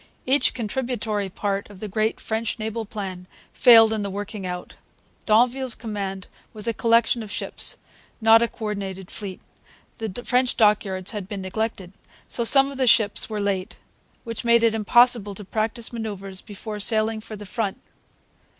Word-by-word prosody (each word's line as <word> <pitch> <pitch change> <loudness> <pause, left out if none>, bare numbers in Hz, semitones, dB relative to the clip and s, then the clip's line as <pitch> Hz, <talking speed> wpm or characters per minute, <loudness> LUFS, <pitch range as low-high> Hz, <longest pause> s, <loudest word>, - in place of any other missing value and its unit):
Each 275 +3 +3
contributory 225 -3 -2
part 200 +1 -3
of 200 -2 -13
the 215 - -5
great 215 +2 -1
French 220 +1 -2
naval 220 0 -4
plan 190 -4 -6 0.3
failed 225 -3 +7
in 215 - -1
the 200 - -3
working 200 0 -5
out. 180 0 -6 0.5
D'Anville's 245 +3 +3
command 195 -4 -5 0.3
was 215 -2 -3
a 230 - +1
collection 230 +1 +3
of 215 - -8
ships, - - -3 0.4
not 225 0 +6
a 235 - +3
co 225 - -8
ordinated 195 -3 -5
fleet. 195 -3 -5 0.6
The 225 +1 -4
French 250 0 +1
dockyards 200 -3 +2
had 205 -4 -5
been 200 -2 -5
neglected; 195 -1 -3 0.3
so 235 - +1
some 275 +3 +6
of 275 - -8
the 260 - +2
ships 220 -2 +3
were 215 -1 -3
late, 200 -1 -2 0.5
which 230 -2 -5
made 235 0 +4
it 230 -1 +4
impossible 225 -1 +3
to 205 - -8
practise 225 +4 -2
manoeuvres 195 -4 -5
before 210 0 -7
sailing 220 +1 0
for 215 0 -9
the 205 0 -9
front. 200 0 -3
215 Hz, 165 wpm, -24 LUFS, 200-230 Hz, 0.6 s, failed